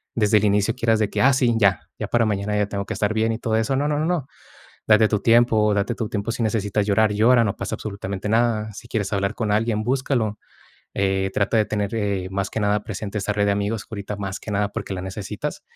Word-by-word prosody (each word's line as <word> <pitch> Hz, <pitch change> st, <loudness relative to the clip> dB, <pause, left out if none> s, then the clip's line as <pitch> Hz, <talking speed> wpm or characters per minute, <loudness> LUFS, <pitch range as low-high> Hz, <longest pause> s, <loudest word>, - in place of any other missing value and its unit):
desde 105 Hz, -2 st, +3 dB
el 105 Hz, -, +2 dB
inicio 105 Hz, +2 st, +2 dB
quieras 115 Hz, -3 st, +1 dB
de 105 Hz, -2 st, +1 dB
que: -, -, -1 dB
"Ah 135 Hz, +2 st, +5 dB
sí, 125 Hz, -3 st, +2 dB
ya, 100 Hz, -3 st, +2 dB
ya -, -, -3 dB
para 120 Hz, -1 st, +2 dB
mañana 105 Hz, 0 st, -1 dB
ya 105 Hz, -1 st, +1 dB
tengo 100 Hz, -1 st, -4 dB
que -, -, -4 dB
estar 105 Hz, +1 st, 0 dB
bien 110 Hz, +1 st, +1 dB
y 110 Hz, -, -5 dB
todo 110 Hz, -2 st, -1 dB
eso". 110 Hz, +4 st, 0 dB
No, 145 Hz, +2 st, 0 dB
no, 150 Hz, 0 st, 0 dB
no, 155 Hz, -, 0 dB
no. 165 Hz, -6 st, -1 dB, 0.6 s
Date 110 Hz, 0 st, +5 dB
tu 105 Hz, -1 st, 0 dB
tiempo, 115 Hz, -2 st, +4 dB
date 100 Hz, +4 st, 0 dB
tu 115 Hz, -2 st, -3 dB
tiempo. 105 Hz, +1 st, -2 dB
Si 115 Hz, -, -3 dB
necesitas 105 Hz, -2 st, 0 dB
llorar, 105 Hz, +1 st, +3 dB
llora, 115 Hz, +3 st, +4 dB
no 100 Hz, -, -1 dB
pasa 95 Hz, -, -4 dB
absolutamente 100 Hz, -1 st, -5 dB
nada. 110 Hz, -1 st, +1 dB
Si 120 Hz, -, -11 dB
quieres 110 Hz, -4 st, -2 dB
hablar 100 Hz, -1 st, 0 dB
con 110 Hz, -3 st, -1 dB
alguien, 110 Hz, 0 st, +1 dB
búscalo. 125 Hz, -4 st, 0 dB, 0.6 s
Eh, 95 Hz, -1 st, 0 dB
trata 100 Hz, +3 st, +1 dB
de 105 Hz, -, +2 dB
tener, 105 Hz, 0 st, -2 dB
eh, 100 Hz, -4 st, -1 dB
más 95 Hz, 0 st, -2 dB
que 110 Hz, -, -3 dB
nada, 105 Hz, 0 st, +1 dB
presente 105 Hz, 0 st, -5 dB
esa 105 Hz, +1 st, -1 dB
red 105 Hz, 0 st, +1 dB
de -, -, +3 dB
amigos, 100 Hz, +1 st, -2 dB
ahorita 105 Hz, -1 st, -5 dB
más 100 Hz, -1 st, -5 dB
que -, -, -8 dB
nada 100 Hz, 0 st, 0 dB
porque 95 Hz, -, -4 dB
la 90 Hz, -, -5 dB
necesitas. 95 Hz, +1 st, -5 dB
105 Hz, 245 wpm, -22 LUFS, 100-115 Hz, 0.6 s, Ah